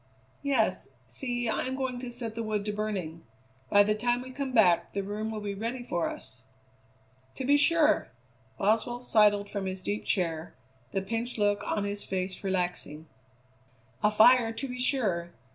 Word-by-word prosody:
"Yes; 225 - +1 0.2
see, 245 - -3
I 220 - 0
am 260 - -2
going 260 -2 -2
to 245 -1 -6
set 235 -2 -5
the 230 - -4
wood 215 -2 -2
to 210 - -2
burning. 195 -6 -3 0.5
By 205 0 +7
the 210 +1 +2
time 240 +3 0
we 255 - -9
come 270 0 -3
back 175 -8 +4
the 200 - -1
room 210 +2 -3
will 215 -1 -4
be 205 -1 -3
ready 230 +5 -4
for 175 -8 -1
us." 130 - -10 0.9
"To 265 - -4
be 285 +2 +5
sure!" 305 +2 +4 0.5
Boswell 225 +4 +1
sidled 205 -3 +4
from 200 -2 -4
his 185 0 -5
deep 205 +2 -2
chair, 165 -3 -1 0.4
the 195 - -1
pinched 230 +4 -3
look 205 -1 +2
on 205 0 -1
his 205 0 -3
face 185 0 -3
relaxing. 180 -5 -2 1.0
"A 210 - +4
fire, 225 +2 +6
to 225 +5 -4
be 250 0 -6
sure. 195 -11 0
215 Hz, 175 wpm, -29 LUFS, 195-245 Hz, 1.0 s, By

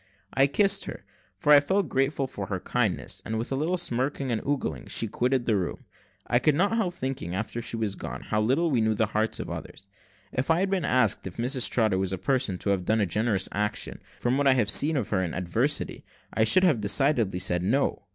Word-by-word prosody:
I 135 +1 +4
kissed 195 +7 +2
her, - - -8 0.3
for 150 -2 +4
I 145 - +9
felt 190 +6 0
grateful 135 +1 0
for 100 -7 -6
her 95 -2 -3
kindness; 110 -2 -1
and 110 - -3
with 115 +4 -4
a - - 0
little 160 +6 0
smirking 135 -3 -1
and 110 - -1
ogling 130 - -2
she 115 - 0
quitted 125 +3 0
the 110 - +2
room. 90 -3 -3 0.4
I 120 - +2
could 150 +2 +2
not 200 +7 +2
help 190 -6 -1
thinking, 130 - -4
after 110 +3 -4
she 115 0 -5
was 110 -3 -1
gone, - - -7
how 105 - -1
little 140 +9 +1
we 120 -4 +2
know 110 0 +1
the 110 - +2
hearts 110 +1 0
of - - -5
others. 95 - -8 0.5
If 130 +4 -2
I 165 +2 +3
had 195 0 0
been 185 -5 0
asked 125 -7 +2
if 90 - -9
Mrs 125 +2 +1
Trotter 110 -5 +1
was 95 -1 -1
a 95 - -2
person 130 -3 0
to 100 - -1
have 95 -2 0
done 110 +1 +2
a 105 - +2
generous 105 +1 0
action, 105 +1 -3 0.2
from 125 +3 0
what 145 - +2
I 135 - +6
had 110 -5 +2
seen 155 +1 +4
of 125 - -2
her 95 -3 +1
in 85 -3 -3
adversity, 110 - -1 0.3
I 110 0 +2
should 185 +12 +4
have 150 -12 +3
decidedly 105 -1 +2
said, 90 -1 0
No. 110 0 0
120 Hz, 230 wpm, -26 LUFS, 105-140 Hz, 0.5 s, I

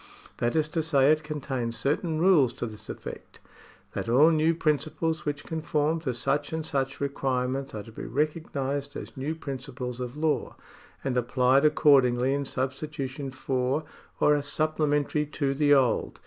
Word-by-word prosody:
That 120 +3 0
is 155 -1 +2
to 160 +1 0
say, 145 -3 +4
it 155 0 +2
contains 135 -6 -3
certain 155 +3 0
rules 160 -9 +5
to 120 - -4
this 110 -2 -9
effect: - - -8 0.5
that - - -3
all 145 +7 +6
new 160 +1 +3
principles 155 +1 0
which 145 0 -2
conform 160 0 -1
to 140 -6 -2
such 140 +4 -1
and 160 -1 -3
such 135 -3 -2
requirements 135 -2 -1
are 105 - -5
to 115 - -13
be - - -7
recognised 145 -2 -2
as - - -7
new 145 +4 -3
principles 130 -4 -6
of 125 +2 -5
law, 155 0 0 0.5
and 135 -2 -1
applied 125 +3 +3
accordingly 135 -4 +4
in 140 0 -1
substitution 135 +1 -3
for, 130 +2 -1 0.4
or 150 - +5
as 145 -1 -2
supplementary 150 -1 +1
to 140 -2 -1
the 145 +1 +2
old. 130 -3 +1
140 Hz, 160 wpm, -27 LUFS, 130-155 Hz, 0.5 s, all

